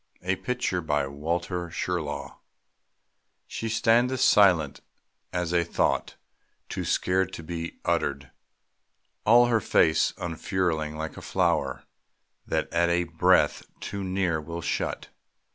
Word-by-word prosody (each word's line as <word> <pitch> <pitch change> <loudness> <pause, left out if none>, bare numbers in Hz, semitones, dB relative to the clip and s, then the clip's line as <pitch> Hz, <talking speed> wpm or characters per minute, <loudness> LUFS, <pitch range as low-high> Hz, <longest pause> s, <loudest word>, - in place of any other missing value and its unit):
A 95 +1 +1
PICTURE 125 -7 -2
BY 75 -3 0
WALTER 85 +4 -3
SHIRLAW. 85 -3 -4 1.1
She 115 - -5
standeth 120 +3 +2
silent 90 -8 +4 0.5
as 90 -1 -2
a 85 -1 +3
thought 85 - 0 0.5
Too - - -3
sacred 95 0 +1
to 80 - -7
be 85 +1 -5
uttered; 70 -2 -1 1.0
all 120 +2 +7
Her 115 -2 +2
face 80 -5 +3
unfurling 80 -3 -2
like 80 0 -5
a - - -7
flower - - 0 0.6
That - - -2
at 85 +1 +3
a 85 0 +2
breath 80 -1 +3 0.2
too 100 0 -5
near 90 -4 0
will 85 +2 -6
shut. - - -2
85 Hz, 120 wpm, -26 LUFS, 80-95 Hz, 1.1 s, all